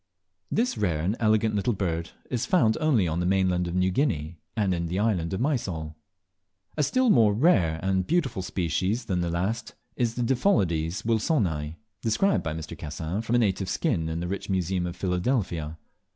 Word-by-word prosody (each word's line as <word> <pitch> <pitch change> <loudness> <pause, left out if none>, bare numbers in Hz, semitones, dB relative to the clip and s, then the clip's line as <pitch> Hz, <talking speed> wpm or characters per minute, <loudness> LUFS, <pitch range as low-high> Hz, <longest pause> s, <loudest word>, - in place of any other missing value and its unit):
This 225 - 0
rare 85 -7 0
and 95 +7 0
elegant 110 0 +2
little 105 +4 +1
bird 85 -4 -2 0.2
is 120 -2 -1
found 115 - +3
only 130 - +3
on 80 +1 -1
the 90 - 0
mainland 90 -2 +2
of 85 - -4
New 90 0 +2
Guinea, 85 - -1 0.2
and 100 -4 +2
in 85 -1 -2
the 90 +3 -2
island 95 -6 0
of 95 - -2
Mysol. 95 - -2 0.8
A 150 - 0
still 250 - +3
more 110 - +5
rare 95 - +3
and 95 -1 0
beautiful 155 - 0
species 95 - -1
than 90 -4 -1
the 85 - -1
last 95 +7 -2 0.2
is 120 -2 0
the 120 - -1
Diphyllodes 95 - +1
wilsoni, 100 - 0 0.3
described 190 - +2
by 80 -1 -3
Mr. 80 0 -6
Cassin 80 +6 -4
from 115 +1 -1
a - - +5
native 95 -4 +1
skin 90 - 0
in 80 +1 -3
the 90 - -3
rich 100 +2 -4
museum 90 -1 0
of 85 - -5
Philadelphia. 90 - -1
95 Hz, 180 wpm, -26 LUFS, 85-115 Hz, 0.8 s, more